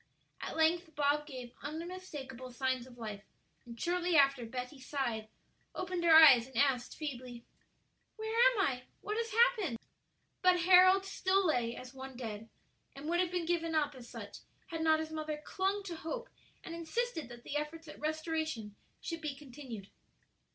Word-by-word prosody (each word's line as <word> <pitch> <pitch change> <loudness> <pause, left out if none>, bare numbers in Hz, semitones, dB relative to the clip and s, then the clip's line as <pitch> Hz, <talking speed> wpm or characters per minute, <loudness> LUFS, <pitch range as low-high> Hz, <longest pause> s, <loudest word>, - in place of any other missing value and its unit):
At - - -5
length 325 0 +2
Bob 295 +1 +2
gave 255 -4 -8
unmistakable 295 -5 -6
signs 255 0 -1
of 245 -1 -15
life; 215 -3 -6 0.5
and 235 -1 -9
shortly 350 0 +1
after 275 -4 +4
Betty 250 +4 -6
sighed, 255 -5 -2 0.5
opened 365 -1 -2
her 330 -2 +7
eyes, 270 -7 +9
and 265 -3 -9
asked, 265 -3 +2
feebly, 250 -5 -6 0.7
"Where 440 0 -4
am - - +5
I? 250 -8 0 0.2
what 425 +1 -3
has 460 0 -1
happened?" 435 - +3 0.6
But 365 -1 +5
Harold 370 +2 +7
still 390 0 +1
lay 245 -7 +1
as 255 +1 -9
one 265 -1 -8
dead, 225 -2 -6 0.5
and 280 +2 -7
would 345 +1 +2
have 365 -1 +2
been 355 -1 -2
given 330 -1 0
up 295 -2 +2
as 250 -3 -12
such - - -8 0.3
had 325 -1 -3
not 315 -1 +4
his 315 0 -4
mother 310 -1 -3
clung 390 +2 -1
to 355 -3 -5
hope, 475 +11 -5 0.3
and 330 - -7
insisted 335 - -2
that 240 0 -11
the - - -6
efforts 310 +2 -3
at 300 - -10
restoration 310 -8 -2 0.3
should 330 -1 -4
be 300 -3 -3
continued. 255 -7 -9
305 Hz, 165 wpm, -33 LUFS, 255-345 Hz, 0.7 s, eyes